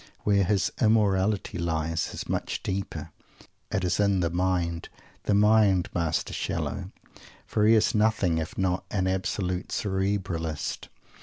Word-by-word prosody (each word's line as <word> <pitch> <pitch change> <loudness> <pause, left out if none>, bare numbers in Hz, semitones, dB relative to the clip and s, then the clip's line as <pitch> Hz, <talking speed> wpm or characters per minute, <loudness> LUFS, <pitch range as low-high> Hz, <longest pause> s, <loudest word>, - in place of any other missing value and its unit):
Where 100 -2 +3
his 100 +1 +1
"immorality" 105 -4 +2
lies 80 0 -1
is - - -6
much - - -2
deeper. 95 0 -4 0.6
It 95 - -1
is 90 +1 0
in 100 -2 +3
the 85 -1 0
mind 90 -2 -1 0.4
the 105 - +2
mind, 105 -3 +4
Master 85 -2 -1
Shallow! - - -3 0.5
for 105 0 +1
he 115 - +7
is 110 - +3
nothing 105 -6 +2
if 80 - -5
not 95 -1 0
an 95 -3 0
absolute 95 -1 -1
"Cerebralist." 95 -5 -2
95 Hz, 135 wpm, -27 LUFS, 85-105 Hz, 0.6 s, he